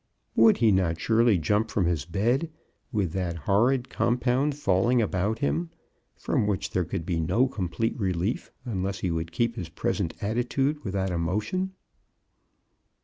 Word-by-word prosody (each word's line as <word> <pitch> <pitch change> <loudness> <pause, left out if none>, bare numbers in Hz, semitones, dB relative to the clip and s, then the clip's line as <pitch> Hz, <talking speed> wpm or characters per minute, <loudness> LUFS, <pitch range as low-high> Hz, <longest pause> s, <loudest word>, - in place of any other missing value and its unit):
Would 115 -1 +6
he 115 -2 +4
not 90 -4 +1
surely 115 -2 +3
jump 105 +7 +1
from 100 - 0
his 85 -5 0
bed, 120 - 0 0.4
with 100 -8 0
that 90 -1 -2
horrid 120 +6 +3
compound 125 +4 +1
falling 115 0 +2
about 105 0 0
him 80 +4 -1 0.2
— - - -45
from 105 - +1
which 100 -2 -1
there 90 -2 0
could 85 0 -4
be 85 -2 -1
no 115 +11 +2
complete 110 0 -2
relief 95 +2 -1
unless 100 -2 -3
he 90 - 0
would 80 0 -3
keep 115 +6 0
his 90 -7 -5
pres - - -1
ent 80 - -3
attitude 125 +7 -1
without 95 -3 -1
a 85 - -1
motion. 110 - -1
100 Hz, 160 wpm, -27 LUFS, 90-120 Hz, 0.4 s, Would